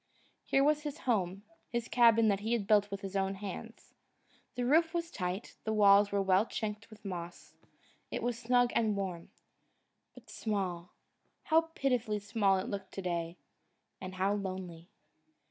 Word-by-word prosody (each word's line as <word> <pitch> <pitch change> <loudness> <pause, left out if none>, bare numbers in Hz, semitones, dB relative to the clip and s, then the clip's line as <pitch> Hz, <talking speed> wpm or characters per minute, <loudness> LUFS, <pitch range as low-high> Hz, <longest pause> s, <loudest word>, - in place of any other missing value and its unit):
Here 270 - +3
was 300 +1 +3
his 295 0 -5
home, 195 -5 0 0.3
his 235 0 -2
cabin 230 -2 +5
that 200 -1 +1
he 220 +3 -1
had 225 -4 0
built 205 -1 +4
with 200 0 -5
his 195 0 -6
own 195 0 0
hands. 210 +4 -8 0.6
The 245 - -1
roof 320 +5 +3
was 335 0 -2
tight, 185 - -4
the 220 - -1
walls 205 -1 +6
were 200 -1 +1
well 190 +3 +3
chinked 215 0 -4
with 215 -1 -16
moss. 175 -2 -7 0.6
It - - -4
was 240 -1 -1
snug 245 0 +3
and 215 -3 +1
warm. 180 -4 -4 0.9
But - - -15
small 185 -5 -3 0.5
how 325 +1 +3
pitifully 245 -5 0
small 205 -1 +1
it 185 - -3
looked 195 -1 -5
to 195 - -5
day 170 -1 -3 0.6
and 185 0 -6
how 190 +2 +1
lonely! 185 -4 -5
205 Hz, 165 wpm, -32 LUFS, 190-235 Hz, 0.9 s, walls